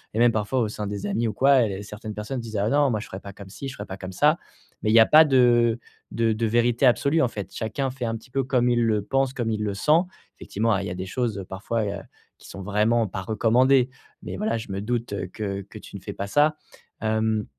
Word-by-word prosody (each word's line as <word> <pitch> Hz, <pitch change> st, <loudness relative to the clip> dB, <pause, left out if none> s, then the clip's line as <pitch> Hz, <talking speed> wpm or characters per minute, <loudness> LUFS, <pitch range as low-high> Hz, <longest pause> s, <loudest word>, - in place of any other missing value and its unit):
et -, -, 0 dB
même, 120 Hz, 0 st, +5 dB
parfois, 110 Hz, +4 st, -1 dB
au 110 Hz, -, +1 dB
sein 105 Hz, -1 st, -5 dB
des 100 Hz, -1 st, -4 dB
amis 115 Hz, +4 st, 0 dB
ou 110 Hz, -, -2 dB
quoi 135 Hz, -1 st, +5 dB
et 100 Hz, 0 st, -5 dB
certaines 105 Hz, +1 st, -8 dB
personnes 105 Hz, +5 st, -4 dB
disent: 110 Hz, -2 st, -6 dB
«Ah 100 Hz, +2 st, +1 dB
non, 145 Hz, +1 st, +3 dB
moi 110 Hz, -, 0 dB
je -, -, -7 dB
ferais 95 Hz, -, -7 dB
pas 100 Hz, -, -9 dB
comme 95 Hz, 0 st, -12 dB
ci, 135 Hz, +7 st, -7 dB
je 135 Hz, -, -9 dB
ferais -, -, -7 dB
pas 95 Hz, -, -7 dB
comme 95 Hz, 0 st, -7 dB
ça». 150 Hz, -, +3 dB, 0.5 s
Mais 110 Hz, -, +1 dB
il -, -, +2 dB
y 115 Hz, -, +8 dB
a 110 Hz, -, +7 dB
pas 155 Hz, +1 st, +7 dB
de 120 Hz, -4 st, +4 dB, 0.3 s
de 115 Hz, -1 st, +1 dB
de 110 Hz, +2 st, -1 dB
vérité 120 Hz, +3 st, +2 dB
absolue, 140 Hz, +6 st, +3 dB
en 130 Hz, -, +3 dB
fait. 100 Hz, -5 st, -7 dB
Chacun 125 Hz, +4 st, -2 dB
fait, 125 Hz, -2 st, -5 dB
un 115 Hz, -, -2 dB
petit 115 Hz, +3 st, -12 dB
peu, 135 Hz, +1 st, 0 dB
comme 125 Hz, -1 st, +1 dB
il 120 Hz, -1 st, +2 dB
le 110 Hz, -2 st, +1 dB
pense, 135 Hz, +3 st, 0 dB
comme 120 Hz, -4 st, -2 dB
il 105 Hz, -1 st, -2 dB
le 105 Hz, -1 st, -1 dB
sent. 155 Hz, -, +3 dB, 0.4 s
Effectivement, 115 Hz, +3 st, -1 dB
a 100 Hz, -, 0 dB
il 100 Hz, -, -4 dB
y -, -, -4 dB
a -, -, -4 dB
des 95 Hz, +1 st, -5 dB
choses 105 Hz, -2 st, -3 dB
parfois, 110 Hz, +4 st, -2 dB
heu, 100 Hz, 0 st, -4 dB, 0.4 s
qui -, -, -15 dB
sont 100 Hz, -, -8 dB
vraiment 105 Hz, +3 st, +2 dB
pas 95 Hz, -, -5 dB
recommandées 120 Hz, +5 st, +3 dB, 0.3 s
mais -, -, -6 dB
voilà, 210 Hz, -, -1 dB
je 110 Hz, -3 st, -7 dB
me 95 Hz, +1 st, -3 dB
doute 120 Hz, 0 st, -2 dB, 0.2 s
que 100 Hz, -2 st, -4 dB
que 100 Hz, +3 st, -12 dB
tu -, -, -13 dB
ne -, -, -13 dB
fais 100 Hz, -, -6 dB
pas 100 Hz, -, -4 dB
ça, 150 Hz, +8 st, +3 dB, 0.5 s
hem, 110 Hz, -1 st, 0 dB
115 Hz, 265 wpm, -24 LUFS, 105-125 Hz, 0.5 s, y